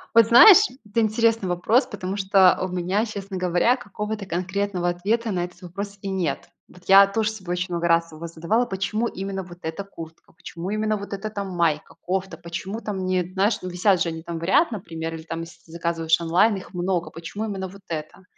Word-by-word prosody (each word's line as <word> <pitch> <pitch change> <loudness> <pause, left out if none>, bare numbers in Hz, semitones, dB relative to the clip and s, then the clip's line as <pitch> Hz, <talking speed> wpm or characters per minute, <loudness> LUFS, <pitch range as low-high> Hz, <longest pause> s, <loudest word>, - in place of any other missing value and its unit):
Вот 230 -1 +7
знаешь, 250 - +10 0.3
это 210 +2 -1
интересный 225 -1 +2
вопрос, 180 +9 +2
потому 195 -1 -5
что 190 -2 +5
у 185 - 0
меня, 185 +4 -1
честно 200 -3 -6
говоря, 180 +7 +2
какого-то 210 -1 -5
конкретного 185 +1 -1
ответа 215 +6 -1
на 175 -2 -1
этот 180 +2 -14
вопрос 200 +3 -7
и 195 - -4
нет. 180 -7 -2 0.2
Вот 180 - -18
я 195 +1 +8
тоже 215 +2 0
собой 190 -5 -5
очень 180 +1 -2
много 170 0 0
раз 165 0 +2
его 155 +2 -7
задавала: 170 +9 0
"Почему 215 +2 -2
именно 195 -2 -5
вот 175 -1 -13
эта 160 +5 -4
куртка, 165 -4 -12
почему 170 +2 -7
именно 215 +1 0
вот 200 0 -7
эта 200 +2 -4
там 200 -2 -5
майка, 170 -4 -1
кофта, 190 +1 -3
почему 185 +6 -6
там 195 -4 -4
не, 185 -1 +1
знаешь, 205 +3 +1
висят 185 +1 +1
же 170 - +1
они 160 0 -6
там 170 0 -6
в - - -8
ряд, 280 - +3
например, 165 -6 -5
или 160 - -9
там 165 0 -5
если 170 +1 -11
ты 160 - -17
заказываешь 165 -1 0
онлайн, 180 +6 +3
их 190 - -11
много. 175 -2 -1
Почему 170 +7 -6
именно 190 -3 -4
вот 195 +2 -14
эта?" 155 +3 -6
190 Hz, 205 wpm, -24 LUFS, 170-205 Hz, 0.3 s, знаешь